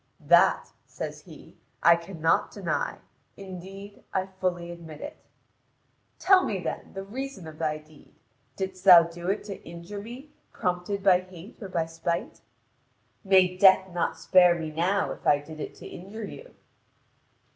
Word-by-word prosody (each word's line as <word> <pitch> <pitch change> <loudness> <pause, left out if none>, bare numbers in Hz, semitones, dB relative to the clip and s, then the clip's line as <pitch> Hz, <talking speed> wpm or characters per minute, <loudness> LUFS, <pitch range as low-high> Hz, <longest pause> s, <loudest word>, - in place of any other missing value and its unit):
"That," - - +4 0.2
says - - -6
he, - - -15 0.2
"I 170 0 +8
cannot 165 -1 0
deny. - - -2 0.4
Indeed, 195 +1 -10
I 190 0 0
fully 185 -2 -3
admit 165 -3 -10
it." 300 - -7 1.0
"Tell 380 -1 +5
me, 195 - -2
then, 170 - -5
the 195 - -4
reason 250 -1 -6
of 155 -1 -10
thy 155 -2 0
deed. 155 -1 -19 0.4
Didst 190 -1 -5
thou 180 -3 +10
do 170 +1 -6
it 200 - -1
to 200 -2 -8
injure 170 +5 -8
me, 250 +7 -10 0.2
prompted 180 +2 -2
by 185 -2 +6
hatred 185 +4 -13
or 195 - -6
by 170 -3 0
spite?" 165 +1 -4 0.8
"May 190 -2 +4
death 190 -1 +5
not 175 - -1
spare 180 -2 +5
me 160 -2 -5
now, 180 +6 0
if - - -7
I 145 - +6
did 155 +2 -11
it - - -6
to - - -11
injure 205 +5 -8
you." - - -11
185 Hz, 155 wpm, -27 LUFS, 170-195 Hz, 1.0 s, thou